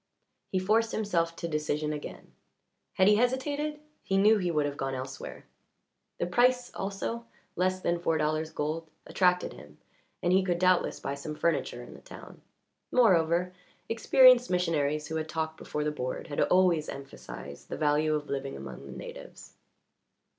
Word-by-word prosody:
He 190 - +1
forced 220 +4 +2
himself 170 -6 0
to 170 - -4
decision 150 -1 -1
again; 150 - -8 0.6
had 190 - +4
he 210 0 +6
hesitated 285 +5 0 0.2
he 195 - 0
knew 210 +2 +5
he 180 -2 -1
would 150 -3 +1
have 145 -1 -3
gone 135 -1 -3
elsewhere. 130 +1 -7 0.7
The - - -1
price 245 +6 +2
also 230 +4 -4 0.3
less 185 +1 0
than 170 -1 0
four 165 -2 +1
dollars 155 +1 0
gold 160 +1 -3 0.2
attracted 180 -1 +2
him, 75 0 -14 0.5
and 175 - +3
he 190 0 +4
could 175 -2 0
doubtless 185 0 +2
buy 140 - -3
some 145 +2 -6
furniture 155 - -1
in - - -11
the - - -13
town. - - -12 0.5
Moreover, 180 -6 +3 0.4
experienced 250 +2 +6
missionaries 155 -4 0
who 160 +1 -3
had 155 0 -4
talked 160 0 -3
before 150 - -4
the 150 - 0
board 130 +2 -4
had 145 - -1
always 180 -4 +3
emphasized 70 - -9
the - - -4
value 155 +1 +2
of 150 -1 -3
living 135 0 -4
among 70 0 -9
the - - -9
natives. - - -10
165 Hz, 160 wpm, -29 LUFS, 150-195 Hz, 0.7 s, he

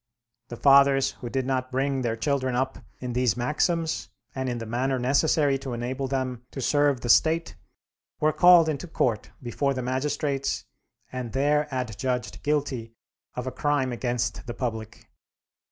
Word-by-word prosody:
The 120 - -7
fathers 140 0 +5
who 120 - -5
did 130 +1 -1
not 130 -1 -1
bring 135 +1 0
their 115 -2 -1
children 130 0 -1
up 130 +1 -1 0.2
in 125 -1 -4
these 125 -2 +1
maxims, 160 +6 0 0.2
and 130 -1 -2
in 120 - -2
the 115 - -5
manner 130 +4 -1
necessary 140 +2 +2
to 135 -2 -5
enable 130 +3 -3
them 130 -2 -3
to - - -8
serve 145 -1 +2
the 120 - -4
State, 160 +7 +3 0.6
were 155 0 +2
called 175 -2 +7
into 155 +2 -3
court 120 -8 -1
before 135 +3 -1
the 130 - -3
magistrates 135 +2 -1 0.5
and 125 -3 -5
there 145 +2 +2
adjudged 125 -1 -3
guilty 135 -6 -2 0.4
of 125 - -4
a 130 - -3
crime 145 -1 0
against 120 -2 -2
the 120 - -5
public. 110 -3 -5
130 Hz, 155 wpm, -26 LUFS, 125-140 Hz, 0.6 s, called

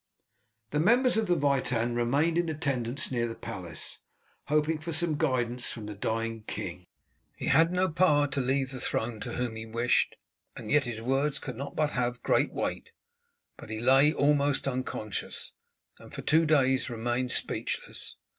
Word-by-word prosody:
The 150 - 0
members 245 - +4
of 220 -1 +1
the 175 - +3
Witan 130 -5 +1
remained 140 +8 +1
in 170 -1 +1
attendance 140 -4 -1
near 120 -2 0
the 115 - -6
palace, 90 -4 -5 0.5
hoping 155 +1 +1
for 165 +2 -5
some 160 0 +3
guidance 125 -5 0
from 110 -3 -6
the 105 - -6
dying 115 +2 -2
king. - - -5 0.5
He - - -3
had 165 +4 +5
no 180 +1 +2
power 155 -4 +3
to 140 0 0
leave 135 +1 0
the 130 - -5
throne 115 -2 -1
to 120 +2 -5
whom 120 -2 -2
he 110 0 -6
wished, 120 +2 +1 0.4
and 110 -3 -7
yet 150 -2 +4
his 115 -2 -5
words 135 +4 +1
could 125 -3 -6
not 140 +4 -6
but 150 -1 +1
have 125 0 -2
great - - +2
weight; - - -3 0.7
but - - -11
he 110 0 -4
lay 135 +5 +5
almost 145 -2 +2
unconscious, 125 -5 -4 0.5
and - - -14
for - - -7
two 160 +1 +3
days 135 -3 +3
remained 120 +2 -2
speechless. - - -3
135 Hz, 170 wpm, -29 LUFS, 120-150 Hz, 0.7 s, had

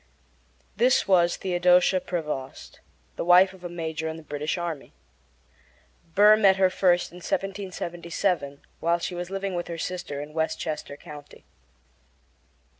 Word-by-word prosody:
This 245 -1 +3
was 175 -3 +4
Theodosia 180 0 +3
Prevost, 150 -8 -5 0.4
the - - -2
wife 180 +2 +6
of 185 -1 -16
a 175 - -5
major 160 -2 -4
in 160 0 -5
the 160 - -11
British 150 +3 -3
army. 170 -4 -5 1.2
Burr 210 +2 +7
met 200 -3 +5
her 190 -1 +3
first 180 -2 +2
in 175 - -12
1777, 175 -5 -3 0.2
while 170 +1 +2
she 175 +1 -4
was 175 0 -5
living 195 0 -3
with 175 -1 -3
her 170 - -5
sister 175 -5 -4
in 150 +1 -8
Westchester 155 -2 -3
County. 150 -2 -13
175 Hz, 135 wpm, -26 LUFS, 160-185 Hz, 1.2 s, Burr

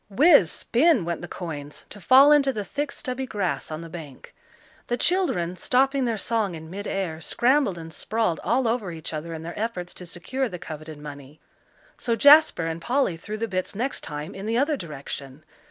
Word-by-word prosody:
Whiz 275 - +6
spin 255 - +2
went 170 -1 -3
the 175 - -6
coins, 150 -6 -7
to 205 - -10
fall 270 +7 +7
into 280 -2 +5
the 210 -5 -4
thick 290 +6 -3
stubby 260 -1 -4
grass 200 -6 -2
on 155 0 -5
the 165 - -8
bank. 155 -6 -10 0.5
The 240 - -1
children, 245 - +1
stopping 270 +3 +2
their 230 -2 -1
song 210 -4 -1
in 160 0 -10
mid 200 +2 -6
air, 170 -5 -3
scrambled 250 - +2
and 165 -1 -9
sprawled 220 +1 -1
all 250 0 +1
over 225 -5 -1
each 160 -1 -6
other 155 +2 -5
in 160 - -7
their 170 +1 -6
efforts 185 -6 -3
to 180 - -10
secure 250 +9 -3
the 180 - -6
coveted 155 -2 -8
money. 145 0 -10 0.6
So 235 -2 0
Jasper 290 - +6
and 165 0 -4
Polly 245 -2 +1
threw 210 +6 -6
the 230 +1 -2
bits 185 -1 -3
next 250 +6 -2
time 150 +4 -6
in 195 +2 -7
the 230 +1 +1
other 290 +4 +2
direction. 140 - -7
195 Hz, 195 wpm, -25 LUFS, 165-255 Hz, 0.6 s, fall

